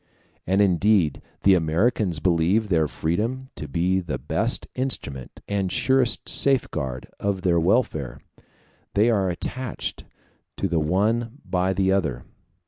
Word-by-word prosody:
And 95 +3 +3
indeed 95 -4 +2 0.2
the 100 - +6
Americans 90 +2 +1
believe 90 +7 +1
their 80 -4 +2
freedom 115 - -2
to 75 - -7
be 90 +6 +1
the 85 -4 -4
best - - -1
instrument 70 - -4
and 100 -2 -1
surest 130 -2 +2
safeguard 65 - +1
of 100 -2 -1
their 85 -2 +3
welfare: 85 - 0 0.8
they 110 +4 +4
are 100 -4 +1
attached 125 +7 -5 0.5
to 95 - 0
the 85 -3 0
one 110 +9 0
by 95 +1 0
the 95 0 +1
other. 75 -11 0
95 Hz, 130 wpm, -24 LUFS, 85-110 Hz, 0.8 s, the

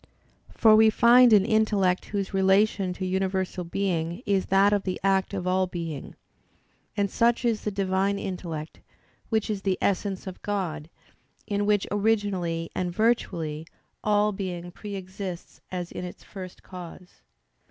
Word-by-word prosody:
For 220 -2 +5
we 220 0 +7
find 240 +2 +6
an 205 -3 +6
intellect 210 -5 +2
whose 200 -2 -3
relation 195 0 +3
to 185 - -4
universal 190 0 -1
being 175 +1 -2
is 200 -3 +1
that 195 +2 +4
of 205 - +2
the 185 -1 -3
act 195 -1 +2
of 190 -3 -4
all 185 0 +2
being: 165 -5 -6 0.8
and 200 -1 +2
such 235 +4 +1
is 230 -3 +1
the - - -2
Divine 195 0 0
intellect, 170 -5 -5 0.5
which 220 -2 +1
is 210 -3 -2
the 190 -2 0
Essence 195 0 -1
of 185 -1 -8
God, 170 -7 -3 0.6
in 205 0 -1
which 205 -2 +2
originally 200 -6 0
and 180 -1 -2
virtually, 170 -8 0 0.4
all 210 0 +3
being 180 -3 -5
pre 205 +2 -7
exists 185 -1 -7
as 180 -2 -4
in - - -6
its 180 - -8
first 185 -3 -10
cause. 180 0 -11
190 Hz, 150 wpm, -26 LUFS, 180-205 Hz, 0.8 s, we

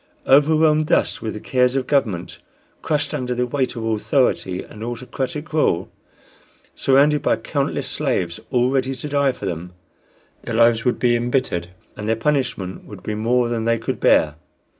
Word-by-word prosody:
Overwhelmed 155 +2 +4
thus - - +1
with 110 -2 -4
the - - -5
cares 125 +2 +1
of 135 -2 0
government, 105 - -1 0.4
crushed 150 -1 -1
under 125 -4 -2
the 125 0 0
weight 130 0 -1
of 115 - -5
authority 110 - 0
and 105 - -10
autocratic 130 +5 -5
rule, 150 - +1 0.8
surrounded 145 +2 +3
by - - +2
countless - - -2
slaves 85 -1 -1
all 125 0 +2
ready 135 0 0
to 150 - -6
die 140 -1 +2
for 105 - -8
them, 90 -1 -5 0.7
their 115 - -4
lives 115 0 +4
would 125 - +2
be 120 -1 +2
embittered 120 -7 -1 0.3
and 105 +1 -5
their 115 - +3
punishment 115 -7 -1
would 95 -3 -11
be 105 - -3
more 120 +3 +1
than 115 -1 -2
they 115 0 +2
could 115 - -4
bear. 75 - +4
125 Hz, 165 wpm, -21 LUFS, 110-135 Hz, 0.8 s, Overwhelmed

